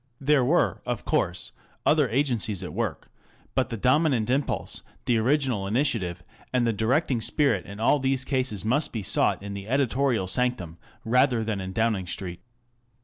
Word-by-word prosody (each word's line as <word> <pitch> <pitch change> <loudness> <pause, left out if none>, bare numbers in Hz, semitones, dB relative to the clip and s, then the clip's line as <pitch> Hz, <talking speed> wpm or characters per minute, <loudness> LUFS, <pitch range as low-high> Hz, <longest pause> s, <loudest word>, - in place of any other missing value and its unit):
There 140 -1 +3
were 160 +8 +2
of 120 -3 -4
course - - 0 0.3
other 150 -4 +4
agencies 115 -6 0
at 90 - -6
work; - - -3 0.4
but - - +1
the 115 - -4
dominant 130 -1 +2
impulse, 135 +2 -1 0.2
the 120 -2 +2
original 125 -5 +1
initiative, 100 - -1 0.3
and 125 -2 +2
the 115 - +1
directing 120 - +1
spirit 135 - +1
in 100 +2 -9
all 120 +6 +3
these 130 -1 0
cases 130 -7 -1
must 140 +7 +1
be 110 -3 -4
sought 95 - +1
in 100 0 -5
the 100 0 -7
editorial 130 -3 +1
sanctum 95 -7 -1 0.3
rather 125 0 +3
than 105 -3 -2
in 95 0 -5
Downing 105 -2 0
Street. 90 0 -5
120 Hz, 160 wpm, -26 LUFS, 100-135 Hz, 0.4 s, other